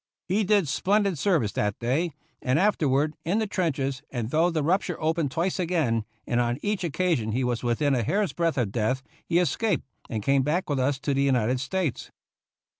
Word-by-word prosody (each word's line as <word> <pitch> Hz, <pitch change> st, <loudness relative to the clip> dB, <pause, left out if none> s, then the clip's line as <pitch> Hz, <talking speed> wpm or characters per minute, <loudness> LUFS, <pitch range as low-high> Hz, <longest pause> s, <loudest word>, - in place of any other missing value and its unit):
He 200 Hz, +4 st, +2 dB
did 200 Hz, -4 st, +3 dB
splendid 195 Hz, +2 st, +1 dB
service 150 Hz, -, +2 dB
that 105 Hz, -1 st, -1 dB
day, 135 Hz, +9 st, 0 dB, 0.3 s
and 130 Hz, +2 st, +1 dB
afterward 155 Hz, -6 st, +2 dB
in 180 Hz, +6 st, 0 dB
the 220 Hz, -, +1 dB
trenches, 140 Hz, -9 st, -1 dB
and 120 Hz, -2 st, -4 dB
though 165 Hz, +3 st, +3 dB
the 160 Hz, -3 st, -1 dB
rupture 180 Hz, +1 st, 0 dB
opened 160 Hz, -2 st, 0 dB
twice 170 Hz, +7 st, -1 dB
again, 155 Hz, -11 st, +1 dB, 0.2 s
and 120 Hz, 0 st, +1 dB
on 120 Hz, 0 st, 0 dB
each 205 Hz, -2 st, -1 dB
oc 165 Hz, -5 st, -2 dB
casion 155 Hz, -11 st, 0 dB
he 130 Hz, +3 st, 0 dB
was 120 Hz, -2 st, -1 dB
within 125 Hz, +4 st, +1 dB
a 125 Hz, -, +2 dB
hair's 195 Hz, -, 0 dB
breadth 170 Hz, -3 st, 0 dB
of 115 Hz, -6 st, 0 dB
death, 120 Hz, +5 st, 0 dB, 0.2 s
he 170 Hz, -, +2 dB
escaped, 180 Hz, -, +1 dB, 0.2 s
and 110 Hz, -2 st, -3 dB
came 135 Hz, +2 st, +3 dB
back 155 Hz, +5 st, 0 dB
with 140 Hz, -, 0 dB
us 135 Hz, +2 st, +1 dB
to 140 Hz, 0 st, 0 dB
the 135 Hz, -, +1 dB
United 130 Hz, -2 st, +2 dB
States. 165 Hz, +1 st, -2 dB
150 Hz, 195 wpm, -26 LUFS, 130-180 Hz, 0.3 s, did